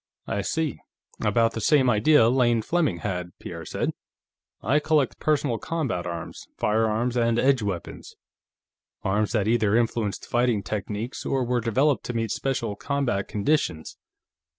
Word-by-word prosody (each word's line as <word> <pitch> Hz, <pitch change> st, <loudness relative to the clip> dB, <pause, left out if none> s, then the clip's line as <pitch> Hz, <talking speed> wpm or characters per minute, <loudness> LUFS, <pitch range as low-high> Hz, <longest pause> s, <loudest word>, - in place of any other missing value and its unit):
"I 100 Hz, -, -2 dB
see; 160 Hz, +8 st, -2 dB, 0.4 s
about 115 Hz, -1 st, +2 dB
the 115 Hz, -, -4 dB
same 135 Hz, +2 st, +4 dB
idea 120 Hz, +2 st, +5 dB
Lane 120 Hz, -2 st, +3 dB
Fleming 155 Hz, -, 0 dB
had," 90 Hz, -3 st, -4 dB
Pierre -, -, -8 dB
said. -, -, -2 dB, 0.7 s
"I 150 Hz, -, +3 dB
collect 150 Hz, -4 st, +1 dB
personal 140 Hz, -6 st, +1 dB
combat 130 Hz, -, -2 dB
arms, 85 Hz, -1 st, -7 dB
firearms 110 Hz, +3 st, +1 dB
and 115 Hz, -1 st, +2 dB
edge 135 Hz, 0 st, +3 dB
weapons. 95 Hz, -5 st, -5 dB, 0.9 s
Arms 105 Hz, +2 st, +1 dB
that 105 Hz, -3 st, +1 dB
either 110 Hz, -2 st, +2 dB
influenced 115 Hz, -3 st, 0 dB
fighting 120 Hz, -4 st, +1 dB
techniques, 105 Hz, +5 st, -4 dB
or 135 Hz, -1 st, 0 dB
were 125 Hz, 0 st, 0 dB
developed 130 Hz, +5 st, +2 dB
to 125 Hz, -, -3 dB
meet 115 Hz, -1 st, -1 dB
special 120 Hz, -6 st, -2 dB
combat 130 Hz, -6 st, -1 dB
conditions. 100 Hz, -, -1 dB
115 Hz, 140 wpm, -25 LUFS, 105-135 Hz, 0.9 s, idea